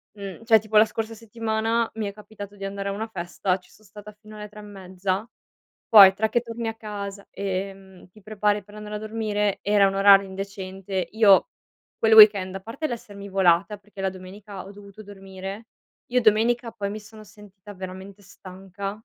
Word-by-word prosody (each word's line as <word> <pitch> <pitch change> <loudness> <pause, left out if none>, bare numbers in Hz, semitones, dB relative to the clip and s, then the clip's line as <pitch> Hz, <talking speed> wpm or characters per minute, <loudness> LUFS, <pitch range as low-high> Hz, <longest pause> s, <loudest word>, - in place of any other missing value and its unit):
mhmm, 200 +1 -8
cioè 220 -2 +6
tipo 215 0 -1
la 215 - +8
scorsa 225 +1 -5
settimana 225 +1 -2
mi 215 -2 -3
è 200 - -6
capitato 205 -1 -11
di 195 0 -7
andare 200 0 -4
a - - -2
una 220 +2 -4
festa, 185 -1 -2
ci 180 - -23
so 215 - -22
stata 210 +1 -12
fino 215 -1 -13
alle 210 0 -8
3 210 0 -13
e - - -9
mezza, 190 +1 -4 0.6
poi 200 -4 +10
tra 220 +2 +1
che 240 - +1
torni 230 -1 -6
a - - -5
casa, 200 -2 -7
ehm, 195 -1 -6
ti 215 +3 -19
prepari 210 -1 -1
per 205 - -18
andare 210 0 -7
a - - -2
dormire 210 -2 -2
era 205 -1 +4
un 195 - -2
orario 195 0 +6
indecente. 190 -1 -5
Io 215 - +5 0.5
quel 220 -1 +3
weekend, 200 -3 +7
a - - -4
parte 255 +9 -5
l'essermi 200 -4 -8
volata 190 +2 +2
perché 200 -1 -12
la 190 - 0
domenica 190 +1 -10
ho 195 - -10
dovuto 205 +1 -13
dormire, 195 +2 -9 0.4
io 250 +1 +2
domenica 230 +2 +2
poi 200 -1 -4
mi 215 +1 -6
sono 215 +1 -14
sentita 205 -1 -15
veramente 190 +2 -9
stanca. 195 +1 -8
205 Hz, 190 wpm, -24 LUFS, 195-215 Hz, 0.6 s, poi